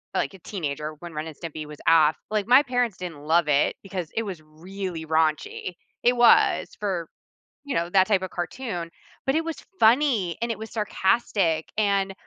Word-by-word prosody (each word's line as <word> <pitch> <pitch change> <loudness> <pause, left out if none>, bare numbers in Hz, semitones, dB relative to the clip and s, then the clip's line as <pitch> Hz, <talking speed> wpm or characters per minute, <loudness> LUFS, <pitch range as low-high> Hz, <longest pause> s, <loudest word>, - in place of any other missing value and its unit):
like, - - 0
a - - -14
teenager 155 -5 -4
when 175 0 -9
Ren 155 +1 -4
and 160 - -8
Stimpy 155 -2 -6
was 150 0 -10
off, 160 -2 +6 0.2
like, 215 -1 0
my 255 +3 +8
parents 245 -6 0
didn't 175 -5 -7
love 165 +1 +3
it 145 -1 +2
because 185 -5 -5
it 225 - +1
was 190 -6 -6
really 175 +2 -6
raunchy. 160 +2 0 0.3
It 245 +1 +4
was 240 -1 +5
for, 190 -5 -2 0.6
you 285 -1 -4
know, 170 +1 0
that 190 0 +5
type 200 -3 +2
of 185 - -4
cartoon, 175 -1 -4 0.4
but 270 - +2
it 325 - +1
was 330 -1 -4 0.2
funny, 225 - +3
and 235 0 0
it 225 - -3
was 220 0 -8
sarcastic 190 -5 0
and, 200 -2 +1
185 Hz, 185 wpm, -25 LUFS, 160-220 Hz, 0.6 s, my